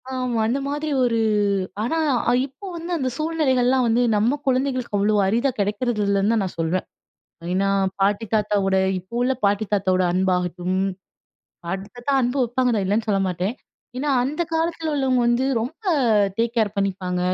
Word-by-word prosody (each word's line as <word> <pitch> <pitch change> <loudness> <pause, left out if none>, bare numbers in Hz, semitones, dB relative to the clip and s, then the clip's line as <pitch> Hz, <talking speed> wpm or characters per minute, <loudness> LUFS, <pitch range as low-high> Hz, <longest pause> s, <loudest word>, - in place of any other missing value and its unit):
ஆமா, 255 -3 -2
அந்த 250 +5 0
மாதிரி 295 +2 -3 0.2
ஒரு 235 -2 +1 0.7
ஆனா 285 +8 -1 0.5
இப்ப 275 +8 -14
வந்து 340 +1 -6
அந்த 265 -4 -1
சூழ்நிலைகள்லாம் 265 -6 +1
வந்து 230 +2 +2
நம்ம 230 +7 +2
குழந்தைகளுக்கு 255 -3 0
அவ்வளோ 205 +2 +2
அரிதா 235 +7 +2
கிடைக்கிறது 210 +3 0
இல்லைன்னு 200 +1 +2
தான் 225 - +2
நான் 185 - -6
சொல்வேன். 165 +3 0 0.7
ஏன்னா 195 +1 +1 0.3
பாட்டி, 200 +3 +2
தாத்தாவோட 205 -2 +1 0.2
இப்ப 185 +3 -15
உள்ள 255 +1 +2
பாட்டி, 200 +2 +2
தாத்தாவோட 185 -2 +2
அன்பாகட்டும். 180 0 0 0.9
பாட்டி, 190 +3 -4
தாத்தா 245 +3 -2
அன்பு 245 +2 0
வைப்பாங்க 250 +1 +1
தான் 205 -3 0
இல்லன்னு 215 +4 0
சொல்ல 200 -2 +2
மாட்டேன். 185 +5 -2 0.4
ஏன்னா, 290 +3 -1
அந்த 300 +6 -1
காலத்தில 325 -1 -1
உள்ளவங்க 265 -3 +1
வந்து 240 +2 +2 0.2
ரொம்ப 290 - -6 0.5
டேக் 230 +1 0
கேர் 215 -3 +1
பண்ணிப்பாங்க. 185 -2 -1
230 Hz, 150 wpm, -22 LUFS, 195-260 Hz, 0.9 s, வந்து